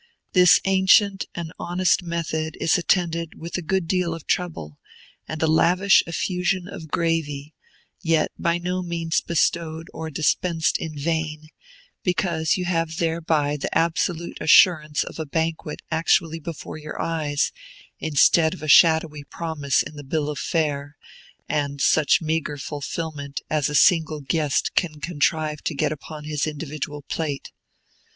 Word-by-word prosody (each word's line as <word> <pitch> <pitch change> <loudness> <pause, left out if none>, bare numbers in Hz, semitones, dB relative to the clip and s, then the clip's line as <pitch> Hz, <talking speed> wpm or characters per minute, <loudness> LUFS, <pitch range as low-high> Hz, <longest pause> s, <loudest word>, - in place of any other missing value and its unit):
This 180 -5 +7
ancient 195 +1 +4
and 165 -2 -5
honest 180 +2 +1
method 160 -2 -3
is 165 - +2
attended 170 -2 0
with 170 +1 -6
a 180 - -1
good 185 +1 -1
deal 180 -2 0
of 165 - -11
trouble, 155 - -3 0.5
and 155 - -5
a - - +5
lavish 180 +5 +4
effusion 180 +1 -1
of 165 -5 -8
gravy, 155 -3 -2 0.5
yet 160 -2 +1
by 170 0 +1
no 180 +1 -2
means 170 -2 -1
bestowed 165 -1 -1
or 160 0 -5
dispensed 160 +2 0
in 155 -2 -6
vain, 155 0 -2 0.5
because 170 -3 0
you 180 - -2
have 165 -2 -1
thereby 160 -3 0
the 145 - -1
absolute 170 +1 -1
assurance 155 -2 +5
of - - -9
a 160 - -2
banquet 160 0 -3
actually 165 0 +1
before 155 0 -7
your 155 0 -8
eyes, 150 -3 -1 0.5
instead 160 +2 +3
of 150 - -12
a - - -4
shadowy 160 -1 +5
promise 145 -2 -1
in 150 - -10
the 145 - -8
bill 150 +2 -2
of 145 - -6
fare, 145 -3 -2 0.5
and 145 -1 -2
such 155 +3 +3
meagre 155 -2 -1
fulfilment 145 +1 -5
as 150 -2 +1
a 150 - -3
single 160 -2 +4
guest 145 +1 0
can 155 -4 -1
contrive 155 -1 -1
to 160 - -3
get 140 - 0
upon 155 0 -8
his 150 0 -2
individual 150 -1 -5
plate. 145 -2 -4
160 Hz, 145 wpm, -23 LUFS, 150-170 Hz, 0.5 s, This